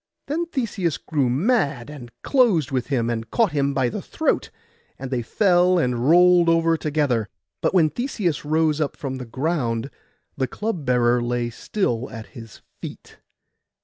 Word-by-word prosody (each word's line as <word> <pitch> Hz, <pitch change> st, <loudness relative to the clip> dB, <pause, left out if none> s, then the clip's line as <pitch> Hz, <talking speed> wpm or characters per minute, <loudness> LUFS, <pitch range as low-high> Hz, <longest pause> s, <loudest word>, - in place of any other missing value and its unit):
Then 330 Hz, +4 st, -2 dB
Theseus 220 Hz, -, -2 dB
grew 145 Hz, -5 st, -1 dB
mad, 145 Hz, -, 0 dB
and 130 Hz, -5 st, -10 dB
closed 215 Hz, -, +3 dB
with 130 Hz, -3 st, -1 dB
him, 125 Hz, -5 st, 0 dB
and 115 Hz, -1 st, -3 dB
caught 225 Hz, -, +2 dB
him 140 Hz, -1 st, +1 dB
by 135 Hz, -2 st, +1 dB
the -, -, -5 dB
throat, -, -, -1 dB, 0.5 s
and 135 Hz, 0 st, -7 dB
they 125 Hz, -2 st, 0 dB
fell 180 Hz, -, +3 dB
and 125 Hz, -4 st, 0 dB
rolled 175 Hz, 0 st, +6 dB
over 165 Hz, 0 st, +3 dB
together; 145 Hz, -9 st, 0 dB, 0.3 s
but -, -, 0 dB
when 160 Hz, -4 st, +4 dB
Theseus 215 Hz, -, -2 dB
rose 155 Hz, 0 st, +1 dB
up 145 Hz, -, -2 dB
from 135 Hz, -2 st, -4 dB
the 125 Hz, -, -7 dB
ground 130 Hz, -2 st, -2 dB, 0.4 s
the 130 Hz, -1 st, -1 dB
club 210 Hz, -, -4 dB
bearer 120 Hz, -1 st, +3 dB
lay 120 Hz, 0 st, -1 dB
still 125 Hz, -, -2 dB
at 110 Hz, -1 st, -8 dB
his 115 Hz, -4 st, -12 dB, 0.2 s
feet. -, -, -10 dB
145 Hz, 160 wpm, -23 LUFS, 120-175 Hz, 0.5 s, rolled